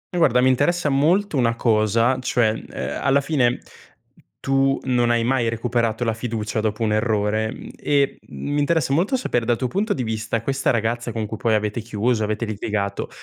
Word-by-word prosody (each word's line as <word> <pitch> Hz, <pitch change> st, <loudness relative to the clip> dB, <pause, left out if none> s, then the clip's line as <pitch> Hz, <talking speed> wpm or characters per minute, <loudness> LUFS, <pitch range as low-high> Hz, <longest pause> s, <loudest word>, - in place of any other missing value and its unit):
Guarda, 135 Hz, -8 st, +4 dB
mi 130 Hz, -, +4 dB
interessa 145 Hz, +6 st, +2 dB
molto 160 Hz, +7 st, +2 dB
una 120 Hz, -3 st, +2 dB
cosa, 115 Hz, +2 st, +2 dB
cioè, 115 Hz, -3 st, +2 dB
mhmm, -, -, -7 dB
uhm, -, -, -4 dB
alla 140 Hz, +1 st, +3 dB
fine 135 Hz, -4 st, +1 dB, 0.8 s
tu 135 Hz, 0 st, +1 dB
non 125 Hz, -2 st, +1 dB
hai 120 Hz, -1 st, +2 dB
mai 120 Hz, -2 st, +1 dB
recuperato 115 Hz, 0 st, -1 dB
la 115 Hz, -, +1 dB
fiducia 110 Hz, -2 st, -3 dB
dopo 105 Hz, 0 st, -2 dB
un 105 Hz, -1 st, +1 dB
errore, 110 Hz, 0 st, 0 dB
mhmm, -, -, -9 dB
e 140 Hz, -1 st, +1 dB
m 145 Hz, -, -6 dB
mi 145 Hz, -, +1 dB
interessa 145 Hz, -2 st, +1 dB
molto 190 Hz, -, +1 dB
sapere 120 Hz, -, -1 dB
dal 120 Hz, 0 st, +1 dB
tuo 130 Hz, -, -1 dB
punto 205 Hz, -, 0 dB
di 130 Hz, -, -3 dB
vista, 110 Hz, 0 st, -2 dB
questa 135 Hz, +2 st, -1 dB
ragazza 120 Hz, 0 st, -1 dB
con 110 Hz, -1 st, -3 dB
cui 105 Hz, -, -5 dB
poi 110 Hz, 0 st, +1 dB
avete 105 Hz, +2 st, -1 dB
chiuso, 110 Hz, +1 st, -1 dB
avete 110 Hz, +2 st, -2 dB
litigato, 105 Hz, -1 st, -3 dB
120 Hz, 190 wpm, -22 LUFS, 110-135 Hz, 0.8 s, Guarda